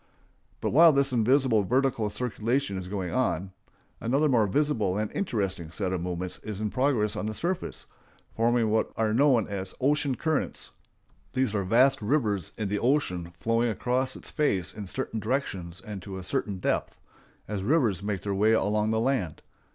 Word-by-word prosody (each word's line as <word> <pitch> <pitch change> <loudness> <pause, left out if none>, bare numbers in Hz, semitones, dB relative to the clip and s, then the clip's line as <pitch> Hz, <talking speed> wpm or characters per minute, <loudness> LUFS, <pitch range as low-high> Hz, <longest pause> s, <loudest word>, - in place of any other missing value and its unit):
But - - -1
while 165 +5 +8
this 140 -2 +2
invisible 125 -1 +3
vertical 125 -1 +1
circulation 120 0 -1
is 95 -1 -5
going 95 -3 -3
on, 95 -7 0 0.5
another 135 +7 +2
more 115 -6 +3
visible 110 -6 +1
and 105 0 -2
interesting 100 - -2
set 95 +3 -2
of 90 - -2
movements 90 +1 -3
is 105 -2 -6
in 105 -1 -2
progress 125 -6 +1
on 105 - -3
the 110 - -3
surface, 175 - -3 0.5
forming 115 -1 +2
what 110 - +1
are 110 -1 +1
known 125 -3 +4
as 95 -2 -5
ocean 140 0 +2
currents. 155 +2 -2 0.6
These 130 -5 +1
are 100 -2 0
vast 125 +7 +4
rivers 105 - 0
in 110 -3 -2
the 105 +1 -1
ocean 90 - 0
flowing 115 +5 +1
across 125 +4 -1
its - - -8
face 100 - 0
in 105 -2 -7
certain 115 +1 -3
directions 95 -8 -3
and 105 -3 -7
to 95 0 -7
a 95 - -7
certain 95 +2 -2
depth, 90 - -1 0.5
as 105 -2 -3
rivers 115 - +2
make 100 -2 -2
their 100 - -2
way 105 +3 +3
along 105 0 +1
the 110 0 +1
land. 115 - -1
110 Hz, 175 wpm, -27 LUFS, 100-130 Hz, 0.6 s, while